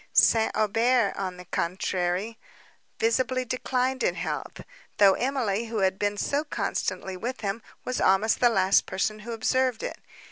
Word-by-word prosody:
St. 225 -1 +4
Aubert, 225 +1 +2
on 185 -2 -4
the 180 - -10
contrary, 180 +5 -2 0.6
visibly 255 +3 +1
declined 255 +1 -1
in - - +1
health; - - -4 0.4
though 200 -2 +7
Emily, 235 -5 -1
who 225 -2 -3
had 190 0 +1
been 205 0 0
so 285 +7 0
constantly 190 -9 -3
with 245 +7 -5
him, 205 +2 -2 0.2
was 255 - -2
almost 200 +4 +3
the 245 - +5
last 195 -3 +3
person 215 +3 -1
who 225 +3 -8
observed 250 +1 0
it. - - -5
220 Hz, 150 wpm, -26 LUFS, 195-250 Hz, 0.6 s, though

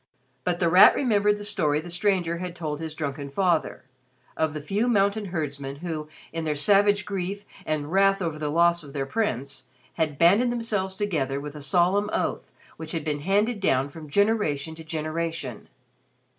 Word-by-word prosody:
But 175 +2 -1
The 175 - +2
Rat 180 +3 +8
remembered 210 -5 +2
the 205 - -8
story 155 -8 +1
the 170 +2 -8
stranger 175 -2 0
had 180 -1 -5
told 150 -4 -4
his 160 -1 -5
drunken 140 -2 -4
father, 170 +2 0 0.5
of 160 -1 -1
the - - -2
few 200 +10 -1
mountain 205 -2 +2
herdsmen 140 -6 -4
who, 155 -1 -5 0.3
in 165 0 -3
their 155 -1 -1
savage 205 +5 +3
grief 195 0 -4 0.2
and 155 -1 -2
wrath 195 +1 +4
over 165 -4 -3
the 150 -1 -2
loss 170 +2 +3
of 145 -3 -12
their 140 -2 -2
prince, 135 - -2 0.3
had 155 -4 -1
banded 200 - +4
themselves 210 -5 -1
together 155 -10 -1
with 145 +1 -7
a 150 - -8
solemn 185 +6 +2
oath - - -2 0.3
which 160 -1 -7
had 165 -2 -2
been 150 -1 -2
handed 205 +7 +1
down 135 -7 +1
from 155 0 -11
generation 170 -6 +1
to 160 0 -10
generation. 160 +1 -4
170 Hz, 175 wpm, -25 LUFS, 150-200 Hz, 0.5 s, Rat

